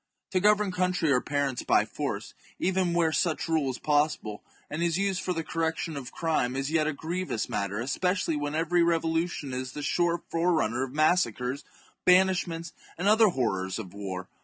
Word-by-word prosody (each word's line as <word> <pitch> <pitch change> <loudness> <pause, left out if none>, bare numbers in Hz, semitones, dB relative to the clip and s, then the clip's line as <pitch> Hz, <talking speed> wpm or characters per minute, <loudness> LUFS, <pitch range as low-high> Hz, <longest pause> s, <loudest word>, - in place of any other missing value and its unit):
To 185 - +2
govern 210 0 +3
country 180 -4 +1
or 125 -2 +3
parents 140 -3 -1
by - - +3
force, - - -4 0.2
even 185 -1 +1
where 165 -2 +3
such 160 +2 0
rule 160 -4 +1
is 130 - -3
possible, 145 -8 0 0.3
and 155 - -4
is 170 -1 +1
used 195 -2 0
for 185 - -2
the 165 -2 -2
correction 165 0 -2
of 135 -3 -6
crime, 155 -7 0
is 135 +2 -2
yet 155 -2 +2
a - - +1
grievous 165 -3 -3
matter, 100 +1 -2
especially 180 +7 0
when 145 0 -2
every 170 +2 +2
revolution 165 -3 0
is 130 0 -4
the 150 - -5
sure 170 +3 +1
forerunner 165 -9 +1
of 135 - -5
massacres, 140 -4 +1 0.4
banish 185 0 +4
ments, 165 -1 -6 0.2
and 175 - -3
the 205 - +6
other 220 0 +6
horrors 95 - -1
of 95 -5 -7
war. 95 -2 -5
160 Hz, 185 wpm, -28 LUFS, 135-175 Hz, 0.4 s, the